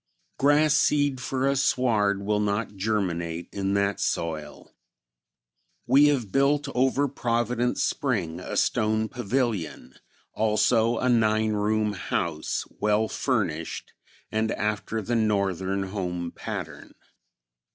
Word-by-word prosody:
Grass 145 +2 +4
seed 145 -3 +2
for 130 +1 -1
a 140 - +2
sward 110 -7 +1
will 105 +1 +1
not 105 0 -1
germinate 85 -5 -2
in 100 0 -1
that 100 0 +1
soil. 80 -3 -3 1.1
We 140 +4 +6
have 125 -9 0
built 140 +1 +2
over 135 +3 +2
Providence 120 -1 -1
Spring 100 - -1
a - - -5
stone 110 0 +1
pavilion, 110 - -2 0.4
also 110 +2 +2
a 125 - 0
nine 110 -2 +2
room 105 0 0
house, 85 -4 -2
well 105 +1 +2
furnished, 95 - -2 0.4
and 110 0 0
after 105 +1 -2
the 120 +4 -1
northern 100 -3 0
home 90 -3 -3
pattern. - - -7
110 Hz, 110 wpm, -26 LUFS, 100-125 Hz, 1.1 s, We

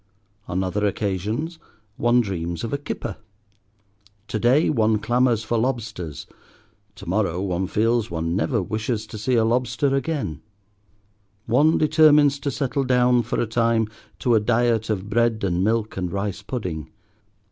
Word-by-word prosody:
On 95 +2 -1
other 100 +3 -2
occasions 105 - -2 0.4
one 120 +1 +3
dreams 85 -5 -4
of 115 - -4
a - - +1
kipper. 120 -6 -5 1.1
To 110 - -2
day 125 +8 +4
one 110 -6 +2
clamours 120 0 +1
for 115 +1 0
lobsters. 110 - -3 0.7
To - - -11
morrow 90 -2 0
one 95 -1 -1
feels 115 +3 +1
one 85 0 -2
never 110 +1 0
wishes 110 +3 -2
to 110 - -9
see 125 +4 0
a 115 -1 +3
lobster 125 +4 +1
again; 135 - -2 1.0
one 145 +8 +3
determines 150 -2 +5
to 140 - -2
settle 140 0 -1
down, 125 -1 +3
for 120 - -3
a - - +1
time, 115 -1 +1 0.3
to 120 - +1
a 110 - +5
diet 115 0 +1
of 100 -2 -2
bread 115 0 +1
and 90 -1 +1
milk 110 0 0
and 90 -2 -2
rice 100 +1 -3
pudding. 95 - -5
115 Hz, 150 wpm, -23 LUFS, 100-125 Hz, 1.1 s, determines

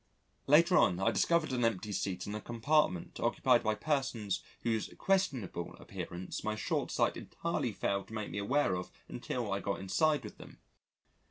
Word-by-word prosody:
Later 170 +5 +6
on, 90 - +3
I 95 - +3
discovered 170 -5 +2
an 125 -1 0
empty 105 -2 0
seat 95 -2 -2
in 105 - -5
a 105 - -4
compartment 120 - +1
occupied 120 +1 +3
by 110 0 +1
persons 130 - -1 0.2
whose 115 -2 0
questionable 135 - 0
appearance 90 +1 -6
my 110 0 -1
short 110 - -1
sight - - +1
entirely - - -2
failed 100 0 -1
to - - -12
make 110 -1 -4
me 100 - -3
aware 130 +1 +2
of 90 0 -3 0.2
until 115 -6 -3
I 100 - 0
got 100 0 -2
inside 145 +11 +2
with - - -9
them. - - -12
110 Hz, 170 wpm, -33 LUFS, 100-140 Hz, 0.2 s, Later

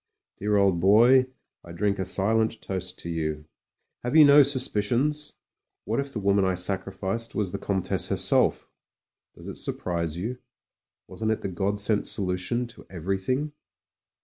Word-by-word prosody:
Dear 105 0 0
old 100 -3 +3
boy, 120 +8 +5 0.4
I 85 - -11
drink 100 +2 -1
a 95 - -1
silent 110 +4 0
toast 95 -1 -4
to 85 - -7
you. 75 -2 -3 0.6
Have 125 +5 -2
you 155 -2 +9
no 145 +1 +8
suspicions? 135 +2 0 0.5
What 115 +4 -1
if 140 0 -3
the 115 - -4
woman 100 0 +2
I 95 -1 +1
sacrificed 95 +4 -3
was 100 -4 -1
the - - -4
Comtesse 95 -2 -1
herself? - - +2 0.6
Does - - -12
it - - -7
surprise 85 -3 -3
you; 120 +8 -4 0.7
wasn't 110 -1 -4
it 110 - -1
the - - -3
God 100 +3 -1
sent 105 0 +1
solution 95 +6 0
to - - -14
everything? 95 - -2
100 Hz, 150 wpm, -26 LUFS, 95-120 Hz, 0.7 s, you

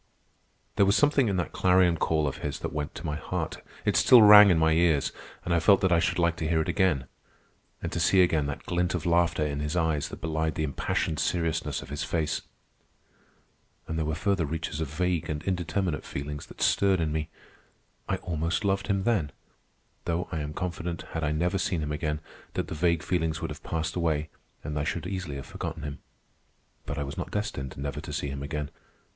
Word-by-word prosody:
There 100 - +6
was 100 - +4
something 145 -4 +4
in 100 -2 0
that 90 - -2
clarion 90 -2 +4
call 80 -1 +1
of 70 - -3
his - - -4
that - - -4
went 75 -1 -4
to 80 - -7
my 75 -1 -2
heart. - - -4 0.2
It - - +2
still 120 -3 +8
rang 105 -1 +10
in 90 - +4
my 80 0 +3
ears, 80 -3 +3 0.3
and 85 - 0
I 85 - +4
felt 100 +4 +5
that 95 - +2
I 85 - +5
should 85 - 0
like 85 -1 +2
to 80 - -2
hear 80 0 +2
it 80 - 0
again—and 90 -9 -3
to - - -2
see 95 -1 +5
again 80 -5 +1
that 70 - -5
glint 90 +1 0
of 80 - -3
laughter 85 -2 +2
in 70 -1 -2
his 75 +3 -2
eyes 80 -4 0
that - - -8
belied 80 0 -1
the 80 - -1
impassioned 75 +1 -1
seriousness 80 -4 -1
of - - -13
his 75 +1 -3
face. 80 0 -1 1.5
And 80 - -3
there 80 -1 -1
were 80 - -1
further 95 +1 +1
reaches 80 0 -3
of 80 - -1
vague 85 +3 -1
and 75 0 -3
indeterminate 90 -3 -1
feelings 70 +1 -6
that - - -5
stirred 95 -2 +3
in 80 -2 0
me. 80 +1 -2 0.8
I - - +2
almost 85 +4 -2
loved 100 0 +1
him 100 -2 +1
then, 100 -11 +1 0.7
though 85 +2 -1
I 80 - -2
am 75 0 -4
confident, 85 -1 -4
had 80 - -3
I 75 - +1
never 90 +5 0
seen 90 -3 0
him 75 - -3
again, 75 0 -2 0.3
that - - -2
the - - -4
vague 85 0 +1
feelings 80 -3 0
would - - -4
have - - -8
passed 80 0 -3
away 80 -3 0 0.3
and 75 0 -4
that 75 - 0
I - - -1
should 80 +2 -2
easily 95 -6 -4
have 70 - -6
forgotten 80 -2 -6
him. 75 -1 -5 0.9
But - - -3
I 70 - -1
was 70 0 -6
not - - -4
destined 85 - -4
never 70 0 -4
to - - -8
see 70 - -2
him 70 0 -5
again. 75 0 -4
80 Hz, 215 wpm, -28 LUFS, 75-90 Hz, 1.5 s, rang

